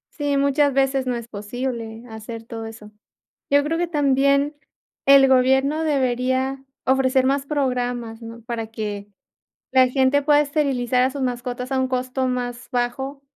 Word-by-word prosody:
Sí, 290 -2 0
muchas 280 0 +2
veces 270 -1 +1
no 250 - 0
es 235 -1 -6
posible, 230 +1 -5
hacer 225 +1 -8
todo 225 0 -7
eso. 220 -1 -11 0.6
Yo 285 0 +5
creo 315 +3 -1
que 350 +1 0
también, 280 -1 +2 0.5
el 275 -1 +7
gobierno 265 +4 +3
debería, 260 -1 0 0.2
ofrecer 260 0 +3
más 275 +1 +1
programas, 245 -5 -2
¿no?, 230 +1 -9
para 230 -1 -5
que 210 -2 -5 0.6
la 260 -1 +5
gente 265 +2 +2
pueda 290 +1 +4
esterilizar 270 -4 +1
a 260 - +1
sus 275 0 -5
mascotas 250 +1 -3
a 265 - 0
un 260 - +1
costo 255 +1 -2
más 245 -1 -3
bajo 265 +3 -2
260 Hz, 155 wpm, -22 LUFS, 240-275 Hz, 0.6 s, el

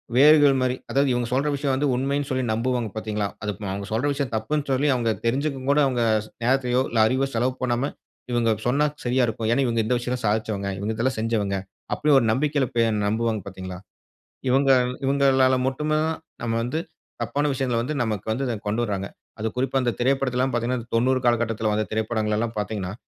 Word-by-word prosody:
வேர்கள் 145 +1 +7
மாரி 130 0 +1 0.2
அதாவது, 140 0 +2
இவங்க 120 -1 -1
சொல்ற 135 +3 +1
விஷயம் 140 -1 -1
வந்து 145 +2 +1
உண்மைனு 140 +2 -1
சொல்லி 130 -1 0
நம்புவாங்க 120 0 -1
பார்த்தீங்களா, 105 -1 -2 0.2
அது 105 - -1
அ - - -3
அவங்க 100 0 -5
சொல்ற 115 +5 0
விஷயம் 140 -4 -3
தப்புனு 145 +7 -1
சொல்லி, 135 +3 +2
அவங்க 115 -2 +1
தெரிஞ்சிக்கவும் 135 +2 -1
கூட 145 - +3
அவங்க 125 -2 -1 0.2
ஸ் - - -16
நேரத்தையோ, 125 0 +2
இல்ல 115 - 0
அறிவோ 130 +4 +1
செலவு 125 +3 +1
பண்ணாம, 125 +2 0 0.4
"இவங்க 120 -1 +2 0.2
சொன்னா 140 +4 +3 0.2
சரியா 125 +1 +1
இருக்கும். 110 0 -3
ஏனா, 120 - +3
இவங்க 115 -2 0
இந்த 125 - +1
விஷயெல்லாம் 125 0 -3
சாதிச்சவங்க. 105 -2 -1
இவங்க 105 +3 -2
இதெல்லாம் 125 +3 0
செஞ்சவங்க." 110 -3 0 0.4
அப்டி 150 - +1
ஒரு 125 - +3
நம்பிக்கையில 140 +2 +1
பே 115 - +4 0.2
நம்புவாங்க 110 0 0
பார்த்தீங்களா, 95 -1 -7 0.7
இவங்க 135 +2 +4 0.3
இவங்களால 135 -1 +4
மட்டும் 150 +3 -1
தான் 155 +1 +1 0.3
நம்ம 115 -1 -1
வந்து 125 +7 -2 0.4
தப்பான 145 +1 -1
விஷயங்கள 130 -3 -1
வந்து 130 +6 -3
நமக்கு 105 -4 -3
வந்து 125 +5 -1
இத 120 - -1
கொண்டு 110 +3 0
வர்றாங்க. 100 -3 -2 0.3
அது 110 - -1
குறிப்பா 135 +1 0
இந்த 120 - +1
திரைப்படத்துல 130 0 +1
எல்லாம் 130 0 +1
பார்த்தீங்கன்னா, 120 0 -2
90 130 +3 +3
காலகட்டத்துல 115 -2 +1
வந்த 105 0 0
திரைப்படங்கள 110 -1 0
எல்லாம் 115 0 -2
பார்த்தீங்கன்னா, 105 -3 -3
125 Hz, 185 wpm, -24 LUFS, 110-135 Hz, 0.7 s, வேர்கள்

